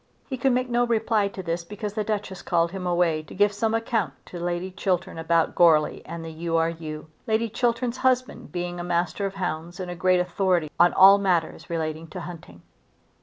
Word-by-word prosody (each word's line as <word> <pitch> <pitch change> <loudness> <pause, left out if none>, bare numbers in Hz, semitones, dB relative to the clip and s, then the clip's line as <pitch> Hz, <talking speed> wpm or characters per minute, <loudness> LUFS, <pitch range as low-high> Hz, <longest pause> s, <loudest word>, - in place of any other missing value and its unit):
He 265 - -3
could 260 +1 +2
make 255 +1 +1
no 240 0 +2
reply 225 -3 +1
to 195 -1 -7
this 170 0 -2
because 205 +3 -6
the 215 0 -1
Duchess 205 -3 -3
called 170 -1 +1
him 185 -1 -4
away 175 -3 +2
to 155 - -13
give 205 +1 +3
some 220 +2 0
account 225 - -1
to 175 - -8
Lady 175 +2 -2
Chiltern 185 -3 -2
about 165 0 +2
Goarly 160 -3 +4
and 165 -1 -6
the 165 - -6
U. 165 +1 -2
R. 165 0 +2
U., 155 -2 -7 0.2
Lady 225 +1 +1
Chiltern's 240 +2 0
husband 255 -1 0
being 175 0 -4
a - - -3
master 175 +3 -1
of 195 - -8
hounds 175 -1 -4
and 180 -1 -4
a - - -5
great 185 +2 +3
authority 180 -3 +1
on 175 0 +6
all 195 +1 +8
matters 180 -5 0
relating 160 -1 -3
to 180 +3 -7
hunting. 155 - -10
180 Hz, 205 wpm, -25 LUFS, 165-210 Hz, 0.2 s, all